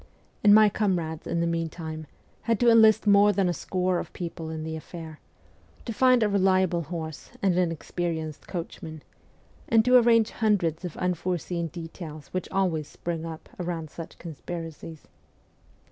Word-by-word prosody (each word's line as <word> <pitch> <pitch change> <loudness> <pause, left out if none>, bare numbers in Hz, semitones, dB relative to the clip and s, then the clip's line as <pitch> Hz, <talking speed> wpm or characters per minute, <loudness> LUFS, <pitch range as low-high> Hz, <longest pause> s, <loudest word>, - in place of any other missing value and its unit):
And 205 0 +8
my 215 0 +8
comrades, 180 -7 -1
in 170 - 0
the - - +1
meantime, 165 -1 -3 0.4
had 230 - +3
to 240 -1 +5
enlist 220 -1 +6
more 205 0 +6
than 195 -1 +1
a 175 - +1
score 185 0 -1
of - - -6
people 165 -2 -6
in 160 -1 -5
the 160 0 -4
affair, 160 -1 -9 0.7
to 230 - -3
find 255 +1 +4
a - - +3
reliable 185 -3 +2
horse 160 -1 -6
and 190 -3 +3
an 175 -2 +2
experienced 160 -2 -4
coachman, 160 -3 -6 0.7
and 225 -1 +4
to 250 0 +7
arrange 230 -2 +4
hundreds 190 -7 +1
of 175 -3 -6
unforeseen 180 -1 -2
details 165 -2 -9
which 185 - -4
always 170 -6 0
spring 165 -1 -5
up 160 -1 -8
around 170 -3 -4
such 165 - -9
conspiracies. 165 -1 -8
175 Hz, 155 wpm, -26 LUFS, 160-200 Hz, 0.7 s, And